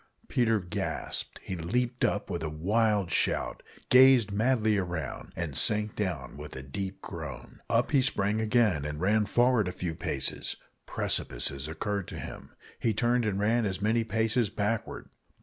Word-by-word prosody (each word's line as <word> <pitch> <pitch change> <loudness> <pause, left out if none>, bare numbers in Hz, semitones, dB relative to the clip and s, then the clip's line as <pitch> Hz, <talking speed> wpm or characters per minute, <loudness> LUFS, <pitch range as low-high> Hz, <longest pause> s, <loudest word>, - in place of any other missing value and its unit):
Peter 115 -3 +2
gasped; 90 -2 -3
he 95 - -4
leaped 120 +9 -1
up 100 - +1
with 85 -3 -3
a 80 - -2
wild 100 +4 +1
shout, - - +1 0.3
gazed 125 -4 +7
madly 110 -1 +2
round, 90 -3 -4
and 80 -5 -3
sank 105 - +1
down 95 -9 -3
with 75 +1 -8
a 65 - -6
deep 95 +8 -5
groan. - - -8
Up 120 +2 +2
he 140 -3 +5
sprang 105 -3 +1
again, 110 - +2
and 75 0 -4
ran 105 +3 +2
forward 120 -2 +3
a - - -1
few 90 -2 -4
paces. - - -2 0.3
Precipices 70 +4 -1
occurred 100 +4 -3
to - - -7
him - - -8 0.3
he 115 -3 +1
turned 120 +1 +2
and 100 -2 -1
ran 115 +3 +2
as 95 -3 -1
many 110 +3 +2
paces 110 +1 +1
backward. 105 +2 -2
105 Hz, 160 wpm, -29 LUFS, 90-115 Hz, 0.3 s, gazed